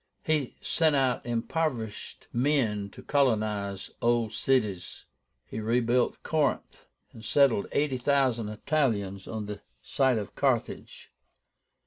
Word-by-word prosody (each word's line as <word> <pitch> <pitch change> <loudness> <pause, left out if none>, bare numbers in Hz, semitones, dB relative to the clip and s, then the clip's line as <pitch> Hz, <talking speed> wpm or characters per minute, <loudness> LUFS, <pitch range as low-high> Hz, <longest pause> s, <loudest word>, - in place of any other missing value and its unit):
He 150 -5 0
sent 160 -3 +2
out 130 -3 +1
impoverished 120 -1 -3
men 120 -6 +1
to - - -13
colonize 105 -7 0
old 115 -2 +1
cities. 105 -8 -1 0.4
He - - -6
rebuilt 120 +2 +1
Corinth, 150 -3 -1 0.3
and 110 - -12
settled 135 -4 +3
eighty 145 -3 +1
thousand 125 -4 +1
Italians 105 -6 -1
on 110 -2 -4
the 105 -1 -7 0.2
site 130 -3 +2
of 105 -3 -5
Carthage. - - -2
120 Hz, 110 wpm, -28 LUFS, 105-140 Hz, 0.4 s, settled